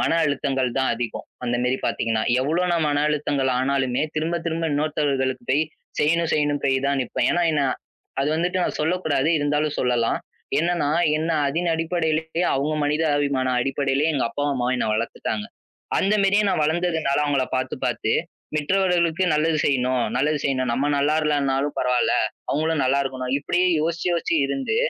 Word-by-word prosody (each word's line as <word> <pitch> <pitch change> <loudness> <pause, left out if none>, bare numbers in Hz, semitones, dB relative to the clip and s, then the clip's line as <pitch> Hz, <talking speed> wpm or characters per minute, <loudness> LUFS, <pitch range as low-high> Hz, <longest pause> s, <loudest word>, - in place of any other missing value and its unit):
மனஅழுத்தங்கள் 145 -5 +1
தான் 130 - +1
அதிகம். 115 -1 -5 0.2
அந்தமாரி 125 +2 0
பாத்தீங்கன்னா. 110 -1 0 0.2
எவ்ளோ 160 +7 0
நான் 165 -3 +1
மனஅழுத்தங்கள் 145 -2 0
ஆனாலுமே 130 0 0
திரும்பத் 165 +2 -1
திரும்ப 165 -1 -1
இன்னொருத்தவர்களுக்குப் 140 -4 -1
போய் 145 +4 +3 0.4
செய்யணும், 165 +2 +2
செய்யணும்னு 145 -1 0
போய் 135 -1 +2
தான் 140 -1 +1
நிப்பேன். 120 - -1
ஏன்னா 175 - +1 0.2
நான் 130 -2 +1 0.5
அது 140 - +1
வந்துட்டு 180 +2 0
நான் - - -2
சொல்லக் 180 +4 0
கூடாது. 145 -1 +1
இருந்தாலும் 150 +1 0
சொல்லலாம். 120 -2 +1 0.4
என்னன்னா, 170 -2 +1 0.3
என்ன 160 +2 -1 0.2
அதின் 170 +4 -1
அடிப்படையிலயே, 160 0 -1
அவுங்க 145 +3 0
மனிதாபிமான 145 -3 +1
அடிப்படையிலயே 135 +3 0
எங்க 135 - +1
அப்பாவும், 145 +4 -1
அம்மாவும் 125 0 0
என்ன 125 - -1
வளர்த்துட்டாங்க. 110 -1 -3 0.5
அந்தமாரியே 200 +1 +3
நான் 175 -5 +1
வளர்ந்ததுனால 160 -3 0
அவுங்கள 140 -3 +1
பார்த்துப் 130 - -3
பார்த்து - - -1 0.4
மற்றவர்களுக்கு 175 +1 +1
நல்லது 155 +1 +2
செய்யணும், 130 -2 +1
நல்லது 150 +3 +1
செய்யணும். 130 -3 0
நம்ம 130 +4 0
நல்லா 150 +2 +1
இல்லன்னாலும் 140 -1 0
பரவாயில்ல. 125 -1 +2 0.4
அவுங்களும் 155 0 0
நல்லா 135 +2 +2
இருக்கணும். 130 -1 -4
இப்பிடியே 175 +5 +1
யோசிச்சு 165 +2 -2
யோசிச்சு 170 -1 0
இருந்து 140 - -2
145 Hz, 145 wpm, -23 LUFS, 130-160 Hz, 0.5 s, போய்